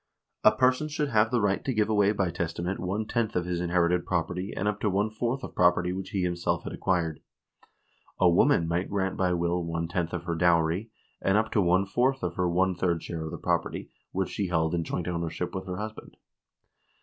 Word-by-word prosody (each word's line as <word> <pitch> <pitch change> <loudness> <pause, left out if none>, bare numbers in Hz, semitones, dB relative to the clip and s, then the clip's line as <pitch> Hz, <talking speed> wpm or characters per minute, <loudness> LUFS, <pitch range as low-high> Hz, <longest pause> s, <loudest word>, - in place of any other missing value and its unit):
A - - +8
person 130 +4 +2
should 150 -1 -2
have 110 -2 +3
the 120 - +1
right 100 -1 +1
to 130 - -2
give 105 -1 +2
away 105 -2 +3
by 95 -4 0
testament 85 +2 -3
one 100 +4 -2
tenth 115 0 -1
of 90 -1 0
his 90 -1 -2
inherited 90 0 +2
property 90 +2 -2
and 105 - -1
up 105 0 -1
to 105 - +1
one 100 +3 0
fourth 120 +4 -2
of - - -7
property 90 0 +3
which 95 0 -5
he 100 -4 -1
himself 85 -1 -1
had - - -6
acquired. 85 -5 0 1.0
A 90 - +5
woman 90 - +4
might 85 +3 -1
grant 95 -2 -1
by 90 -1 +1
will 85 0 0
one 85 0 -2
tenth 85 -1 -2
of 85 -2 -4
her 85 -1 -2
dowry, 85 +4 +2 0.3
and 95 +1 +3
up 110 +1 +1
to 105 - +3
one 90 +2 +3
fourth 125 +5 +1
of 90 -1 -1
her 90 0 0
one 95 +2 +2
third 85 -2 -1
share 80 -2 -5
of - - -4
the - - -5
property - - -2 0.2
which 95 -1 -1
she 100 - -2
held 80 -2 +1
in 85 -1 0
joint 85 +2 -3
ownership 85 0 -3
with 95 0 -5
her 90 -1 -4
husband. 110 +1 -7
90 Hz, 220 wpm, -28 LUFS, 85-105 Hz, 1.0 s, A